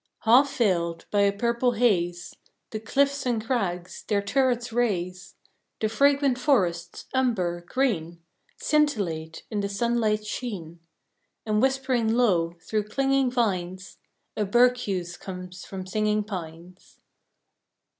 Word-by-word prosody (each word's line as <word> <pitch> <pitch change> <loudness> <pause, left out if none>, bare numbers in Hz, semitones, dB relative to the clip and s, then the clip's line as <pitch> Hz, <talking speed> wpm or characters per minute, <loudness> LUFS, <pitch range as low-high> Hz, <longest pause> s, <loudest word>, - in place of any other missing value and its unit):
Half 255 +5 +4
veiled 170 -7 +1
by 205 - +3
a 200 0 +4
purple 235 +4 +1
haze, 180 -7 0 0.4
The 215 - -3
cliffs 280 +5 +1
and 225 -3 -1
crags, 185 -8 -2
their 205 -2 +2
turrets 245 +1 +1
raise, 185 -6 -1 0.4
The 215 - 0
fragrant 275 +2 +3
forests, 180 - 0
umber, 195 -10 0
green, 175 -11 -1 0.4
Scintillate 195 - 0
in 210 - -1
the 200 0 -1
sunlight's 215 0 0
sheen, 190 -8 -5 0.7
And 215 -1 +1
whispering 260 -4 +1
low, 175 -9 +2
through 215 -2 -1
clinging 270 +3 +1
vines, 185 -6 -2 0.4
A 215 - 0
berceuse 200 -6 +2
comes 180 -1 -8
from 190 -1 -7
singing 210 +2 0
pines. 180 -2 -9
215 Hz, 115 wpm, -26 LUFS, 180-245 Hz, 0.7 s, Half